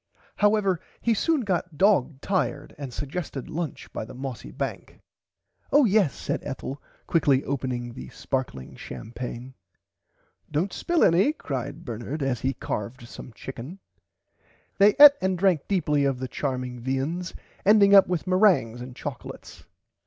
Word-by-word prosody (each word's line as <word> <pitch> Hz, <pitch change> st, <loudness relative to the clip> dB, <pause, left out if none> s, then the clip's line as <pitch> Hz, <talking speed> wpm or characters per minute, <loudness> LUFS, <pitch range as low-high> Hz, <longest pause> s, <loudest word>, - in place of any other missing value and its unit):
However 205 Hz, -4 st, +3 dB, 0.2 s
he 235 Hz, -, +2 dB
soon 310 Hz, +7 st, +1 dB
got 180 Hz, -6 st, -2 dB
dog 155 Hz, -7 st, +3 dB
tired 145 Hz, -7 st, -1 dB
and 140 Hz, -3 st, -6 dB
sugested 145 Hz, 0 st, -5 dB
lunch 165 Hz, -3 st, -5 dB
by -, -, -3 dB
the 110 Hz, -, -10 dB
mossy 130 Hz, -, -6 dB
bank. -, -, -6 dB, 0.7 s
Oh 290 Hz, -1 st, +6 dB
yes 200 Hz, -, +3 dB
said -, -, -3 dB
Ethel 135 Hz, 0 st, -6 dB, 0.2 s
quickly 140 Hz, -5 st, +2 dB
opening 125 Hz, -3 st, -3 dB
the 125 Hz, -, -9 dB
sparkling 125 Hz, -, -4 dB
champaigne. 120 Hz, -, -7 dB, 1.0 s
Dont 160 Hz, +6 st, -1 dB
spill 345 Hz, -2 st, +1 dB
any 190 Hz, -, +4 dB
cried 145 Hz, -, -5 dB
Bernard 120 Hz, +5 st, -4 dB
as 130 Hz, -3 st, 0 dB
he 135 Hz, +1 st, -1 dB
carved 115 Hz, +4 st, -5 dB
some 125 Hz, -, -10 dB
chicken. 135 Hz, -, -8 dB, 1.0 s
They 200 Hz, +1 st, +6 dB
eat 290 Hz, 0 st, +12 dB
and 190 Hz, -1 st, 0 dB
drank 180 Hz, -5 st, +2 dB
deeply 150 Hz, -7 st, +1 dB
of 135 Hz, -2 st, +1 dB
the 130 Hz, +1 st, -4 dB
charming 125 Hz, -2 st, -3 dB
viands 135 Hz, +8 st, -3 dB, 0.3 s
ending 200 Hz, -1 st, +6 dB
up 195 Hz, -1 st, +8 dB
with 175 Hz, -3 st, -2 dB
merangs 185 Hz, -, +3 dB
and 125 Hz, 0 st, -9 dB
choclates. -, -, -8 dB
145 Hz, 140 wpm, -25 LUFS, 125-190 Hz, 1.0 s, eat